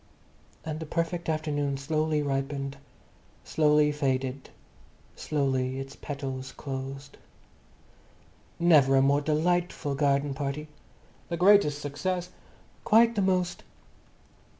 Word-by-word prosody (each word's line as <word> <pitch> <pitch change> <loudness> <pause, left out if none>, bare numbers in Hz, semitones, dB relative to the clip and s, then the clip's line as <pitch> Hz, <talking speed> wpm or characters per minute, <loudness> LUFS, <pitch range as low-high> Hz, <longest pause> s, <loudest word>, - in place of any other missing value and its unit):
And 155 -1 -4
the 160 - -6
perfect 170 +1 -2
afternoon 145 -3 -1
slowly 155 +1 0
ripened, 140 0 -3 0.7
slowly 150 -1 +3
faded, 135 -2 -2 0.7
slowly 130 -3 -1
its 135 0 -7
petals 135 -2 -6
closed. 135 +1 -7 1.4
"Never 150 -6 +5
a 135 - +5
more 140 +1 +3
delightful 160 0 0
garden 140 0 +1
party...." 140 +2 -4 0.6
"The 170 - -2
greatest 180 -6 +4
success...." 175 +6 -3 0.5
"Quite 230 +2 +5
the 210 - 0
most...." 180 -2 0
145 Hz, 100 wpm, -28 LUFS, 135-160 Hz, 1.4 s, Never